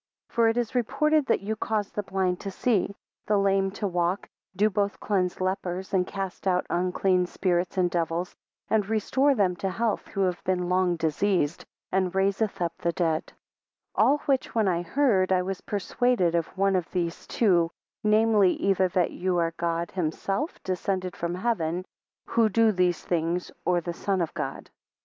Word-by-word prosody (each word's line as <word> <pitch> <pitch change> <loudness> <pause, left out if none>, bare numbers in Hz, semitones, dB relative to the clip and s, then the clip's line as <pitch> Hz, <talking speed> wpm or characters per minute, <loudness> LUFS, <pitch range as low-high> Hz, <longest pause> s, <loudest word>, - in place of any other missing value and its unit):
3 - - -28
For 230 -1 +4
it 225 +1 +1
is 240 -2 -1
reported, 275 +4 +2
that - - +2
you 215 +2 -2
cause 210 -1 -2
the 210 - -2
blind 190 -2 -1
to 200 - -5
see, 200 -1 0 0.3
the 210 - +3
lame 195 -1 +2
to 205 - -4
walk, 175 +1 -1 0.3
do 205 +3 +4
both 205 -1 -1
cleanse 185 -4 0
lepers, 185 0 -2
and 180 -2 +2
cast 195 -1 -5
out 180 -1 +2
unclean 180 +1 +1
spirits 180 0 -1
and 180 -1 +3
devils, 170 +1 -2 0.3
and 210 -2 +1
restore 265 +6 +2
them 190 -5 +2
to 195 - -2
health 225 +3 -1
who 195 - -3
have 180 -2 0
been 180 -1 0
long 180 -1 +2
diseased; 165 0 0 0.3
and 185 -1 0
raiseth 195 +2 +1
up 170 -2 -1
the 170 - 0
dead; 165 -1 -1 0.6
4 - - +4
All 290 - +4
which 270 -4 0
when 220 -3 +3
I 175 -2 +1
heard, 195 -3 +2
I 180 -1 +3
was 190 0 -4
persuaded 205 -2 +1
of 170 -1 +1
one 195 0 +3
of 180 -3 -1
these 170 -2 -3
two, 175 -7 +3 0.3
namely, 215 -3 +4
either 190 -1 +2
that 180 -1 +1
you 180 0 -1
are 165 -1 +1
God 170 0 -2
himself 195 - -2
descended 185 -1 -2
from 170 +1 -3
heaven; 180 -4 -1 0.4
who 230 -2 +2
do 225 +2 +4
these 180 -3 +1
things, 175 +1 -1
or 180 -1 +2
the 175 +1 -4
Son 195 +2 -1
of 170 -3 -1
God. - - -5
190 Hz, 180 wpm, -26 LUFS, 175-210 Hz, 0.6 s, For